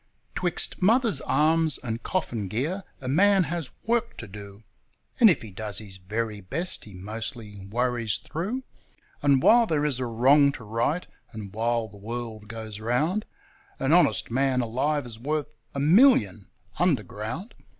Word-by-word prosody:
'Twixt 175 +1 -2
mother's 230 +3 +4
arms 160 -1 +2
and 115 -1 -3
coffin 120 - -2
gear 150 - -2 0.2
a 130 - -6
man 195 +7 +4
has 165 -2 -4
work 235 +1 0
to 115 - -8
do! 100 +1 -11 0.6
And 230 -3 +9
if 170 - +1
he 110 - -9
does 105 +2 -4
his 100 -3 -7
very 105 +3 -4
best 165 - -2
he 105 -3 -12
mostly 105 0 -7
worries 120 0 0
through, 210 +12 -4 0.6
And 140 -2 +3
while 235 0 +6
there 150 -4 +1
is 140 -4 0
a 125 - -2
wrong 135 +5 +5
to 125 - -9
right, 115 - -1 0.3
and 105 -4 -8
while 115 +1 0
the 105 -1 -14
world 110 0 -6
goes 110 -1 -7
round, 150 - 0 0.5
An - - +1
honest - - +3
man 130 0 +2
alive 130 +5 -1
is 115 -2 -9
worth 150 +2 -2 0.2
a - - -1
million 145 - +4 0.3
underground. 145 - -1
125 Hz, 155 wpm, -26 LUFS, 110-160 Hz, 0.6 s, And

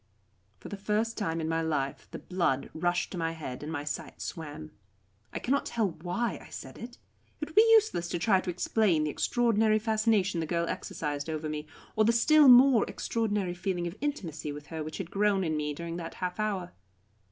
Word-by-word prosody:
For - - -11
the 205 - -5
first 215 +3 -1
time 165 -6 -2
in 160 - -2
my 165 0 0
life 145 -4 -2
the - - -7
blood 170 -8 -1
rushed 175 +2 0
to 180 - -4
my 165 0 -1
head 145 -6 -7
and 150 +2 -5
my 145 -3 -3
sight 145 -1 -5
swam. 155 -1 -6 0.6
I - - -4
cannot 280 +3 0
tell 225 -4 0
why 180 +8 -3
I - - -14
said 130 -1 -9
it. 240 +1 -9 0.4
It 300 - -4
would - - -13
be 445 +4 +6
useless 425 - +3
to 175 - -2
try 190 +1 +3
to 185 - -5
explain 180 -1 +2
the 150 - -1
extraordinary 225 0 +2
fascination 215 -4 +1
the 160 - -2
girl 170 0 0
exercised 145 -2 -4
over 155 0 -3
me, 150 0 -4 0.3
or 215 - +4
the 230 +2 +4
still 300 +5 +6
more 250 -2 +8
extraordinary 210 -5 -1
feeling 175 -1 -2
of 170 +2 -4
intimacy 165 - -3
with 145 0 -8
her 160 -1 -3
which 155 0 -6
had 180 -3 -6
grown 200 -1 +2
in 160 -2 -1
me 150 -1 -1
during 170 +3 -5
that 165 -2 -6
half 180 +1 -4
hour. 195 -4 -2
180 Hz, 205 wpm, -29 LUFS, 160-220 Hz, 0.6 s, more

